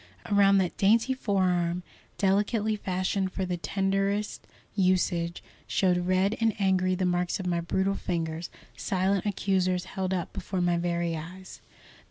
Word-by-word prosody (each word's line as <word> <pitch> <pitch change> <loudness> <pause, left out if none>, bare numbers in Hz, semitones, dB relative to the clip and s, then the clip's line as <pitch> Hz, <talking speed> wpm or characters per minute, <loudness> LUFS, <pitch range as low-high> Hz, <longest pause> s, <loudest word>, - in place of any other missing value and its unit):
Around 200 -1 +5
that 180 -3 0
dainty 225 +6 +3
forearm, 180 -7 0 0.3
delicately 205 +2 +1
fashioned 190 -1 -1
for 190 - -2
the 180 -1 -2
tenderest 195 +3 -1 0.3
usage, 180 -3 +1 0.2
showed 180 -2 +1
red 190 +3 +2
and 225 -2 +2
angry 185 -1 +2
the 185 0 -1
marks 180 +1 0
of 190 - -5
my 175 -1 0
brutal 190 +3 0
fingers, 165 -3 -3 0.3
silent 190 +1 0
accusers 185 -2 0
held 190 0 -3
up 180 -3 -2
before 190 -1 -4
my 175 -1 +2
very 170 -1 -1
eyes. 180 +4 -9
185 Hz, 140 wpm, -28 LUFS, 175-195 Hz, 0.3 s, Around